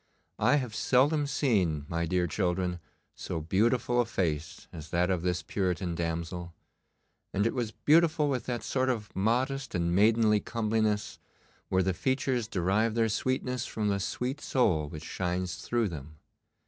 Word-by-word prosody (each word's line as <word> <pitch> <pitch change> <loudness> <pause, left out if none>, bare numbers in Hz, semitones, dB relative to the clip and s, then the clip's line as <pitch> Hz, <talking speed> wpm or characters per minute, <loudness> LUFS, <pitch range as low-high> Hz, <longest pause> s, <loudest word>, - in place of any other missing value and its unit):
I - - +4
have 125 -6 -1
seldom 145 +6 +2
seen, 95 - +1
my 85 0 -1
dear 90 +1 +1
children, 90 +1 -1 0.3
so - - -4
beautiful 115 +9 +2
a - - 0
face 80 -8 -2
as 80 -1 -8
that 90 +3 +1
of 90 -3 0
this 90 -2 -1
Puritan 90 -1 -1
damsel; 85 +1 -4 0.8
and 100 +2 +1
it 115 - +1
was 120 -4 -1
beautiful 155 +2 +3
with 130 -4 -2
that 120 -2 -2
sort 130 -1 0
of 110 -5 -3
modest 125 +6 0
and 85 -1 +1
maidenly 105 +2 +4
comeliness 110 -2 -1 0.5
where 95 0 +2
the 95 +1 +1
features 130 +2 0
derive 110 +2 +1
their 115 -1 +2
sweetness 125 +2 -1
from 105 -2 -1
the 100 -1 0
sweet 125 +8 -3
soul 85 - +1
which 75 0 -8
shines 90 -2 -2
through 115 +3 0
them. 75 -1 -9
105 Hz, 155 wpm, -29 LUFS, 85-125 Hz, 0.8 s, I